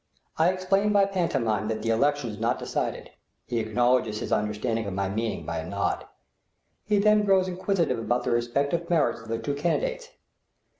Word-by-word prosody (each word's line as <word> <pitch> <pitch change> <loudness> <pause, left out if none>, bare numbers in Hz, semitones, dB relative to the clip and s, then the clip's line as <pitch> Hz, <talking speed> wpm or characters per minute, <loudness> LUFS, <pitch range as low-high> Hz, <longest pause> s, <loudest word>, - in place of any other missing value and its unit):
I 165 +2 +5
explain 195 +3 +1
by 200 -1 +5
pantomime 135 - 0
that 110 -1 -3
the 115 - +1
election 140 +1 +1
is 105 - -9
not 115 +2 +1
decided; - - -3 0.3
he 120 -1 -2
acknowledges 115 0 +1
his - - -5
understanding 105 +1 -1
of 95 - -4
my 100 0 0
meaning 110 +3 -3
by 85 0 -3
a 80 +2 -6
nod. 100 -1 -1 0.8
He 210 -1 +1
then 210 +1 +4
grows 190 -2 +3
inquisitive 180 - 0
about 120 +2 0
the - - -1
respective 140 +8 0
merits 145 -10 +2
of 115 - -13
the 115 0 -2
two 145 +5 -3
candidates. 475 - -1
125 Hz, 180 wpm, -26 LUFS, 110-185 Hz, 0.8 s, I